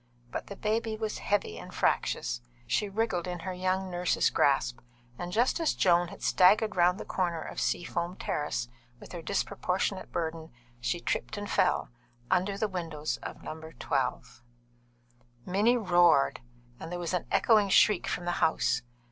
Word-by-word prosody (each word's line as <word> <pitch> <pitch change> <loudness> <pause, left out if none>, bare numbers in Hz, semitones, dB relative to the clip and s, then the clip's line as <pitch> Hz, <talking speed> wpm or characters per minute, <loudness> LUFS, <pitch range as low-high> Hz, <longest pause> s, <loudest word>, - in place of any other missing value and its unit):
But - - -5
the 200 - -7
baby 220 +2 -1
was 215 -1 -3
heavy 190 - -1
and - - -10
fractious. - - 0 0.2
She 210 - 0
wriggled 195 -4 -1
in 175 -1 -4
her 185 +2 -4
young 185 +1 -1
nurse's 175 0 +1
grasp, - - +2 0.4
and 175 0 -4
just 240 - +2
as 330 - +1
Joan 175 -1 +4
had - - -11
staggered 215 +4 +4
round 180 +2 +3
the - - -6
corner 175 -3 -1
of - - -5
Seafoam 175 +1 -1
Terrace, 145 -9 -2 0.3
with - - -12
her 175 -1 -6
disproportionate 190 +1 -1
burden, 160 -1 -3 0.3
she 120 +8 -1
tripped 215 - -2
and 205 0 -4
fell, - - +1 0.4
under 190 +2 +2
the 215 - 0
windows 165 -5 -3
of - - -8
No. 160 +1 -7 0.2
12. 125 -2 -2 1.0
Minnie 210 +7 +3
roared, 175 - +4 0.4
and 165 - -7
there 180 - -3
was 175 0 -3
an 180 - -1
echoing 215 -3 +4
shriek 200 0 +4
from 175 - -2
the 175 - 0
house. 160 -5 +2
180 Hz, 160 wpm, -29 LUFS, 170-205 Hz, 1.0 s, Joan